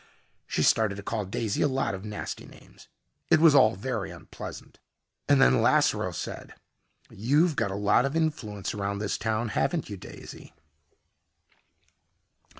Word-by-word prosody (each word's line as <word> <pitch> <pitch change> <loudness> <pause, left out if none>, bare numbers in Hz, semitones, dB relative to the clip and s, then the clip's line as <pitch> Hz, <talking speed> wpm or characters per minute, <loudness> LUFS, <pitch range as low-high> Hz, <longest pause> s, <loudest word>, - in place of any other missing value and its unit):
She - - 0
started 110 -3 +3
to 100 - -8
call 105 0 -3
Daisy 100 +2 -2
a - - +4
lot 135 -5 -1
of 95 0 -6
nasty 105 -1 -6
names. - - -17 0.4
It - - +5
was 160 -2 +7
all 130 -7 +5
very 105 -1 -3
unpleasant. 85 -2 -10 0.5
And - - +5
then 60 +1 +5
Lasseroe - - +2
said, - - -7 0.6
"You've 145 - +2
got 100 - 0
a 95 - -4
lot 105 +5 +3
of 135 +3 -2
influence 115 -12 -2
around 100 -1 -3
this 105 0 -2
town, 110 +1 -1
haven't 155 +4 -1
you, 100 - -5
Daisy?" 85 - -12
110 Hz, 150 wpm, -27 LUFS, 100-135 Hz, 0.6 s, was